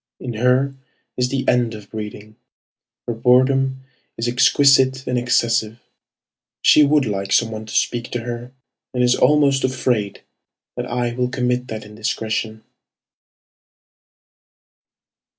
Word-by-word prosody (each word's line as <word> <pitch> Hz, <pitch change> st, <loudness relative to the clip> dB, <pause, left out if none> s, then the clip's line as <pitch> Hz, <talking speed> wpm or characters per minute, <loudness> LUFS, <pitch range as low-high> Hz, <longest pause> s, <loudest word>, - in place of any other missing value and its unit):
In 125 Hz, -, -5 dB
her 125 Hz, +4 st, +1 dB, 0.4 s
is 125 Hz, 0 st, 0 dB
the 135 Hz, 0 st, -3 dB
end 120 Hz, -2 st, +1 dB
of 105 Hz, -2 st, -13 dB
breeding. 110 Hz, 0 st, -8 dB, 0.7 s
Her 120 Hz, -, -1 dB
boredom 130 Hz, +3 st, +2 dB, 0.3 s
is 115 Hz, -, -2 dB
exquisite 130 Hz, +1 st, +3 dB
and 125 Hz, -, -2 dB
excessive. 120 Hz, -2 st, 0 dB, 0.9 s
She 150 Hz, -, +6 dB
would 145 Hz, -1 st, +3 dB
like 100 Hz, -2 st, -3 dB
some 115 Hz, -1 st, +2 dB
one 110 Hz, 0 st, -7 dB
to -, -, -7 dB
speak 120 Hz, 0 st, 0 dB
to 120 Hz, -, -2 dB
her, 120 Hz, +1 st, -6 dB, 0.4 s
And 125 Hz, -, +1 dB
is 125 Hz, 0 st, +4 dB
almost 140 Hz, -2 st, +3 dB
afraid 125 Hz, -6 st, -1 dB, 0.5 s
that -, -, -4 dB
I 120 Hz, 0 st, -2 dB
will 125 Hz, 0 st, -1 dB
commit 125 Hz, 0 st, -1 dB
that 110 Hz, -2 st, -7 dB
indiscretion. 110 Hz, +1 st, -4 dB
125 Hz, 125 wpm, -20 LUFS, 110-130 Hz, 0.9 s, She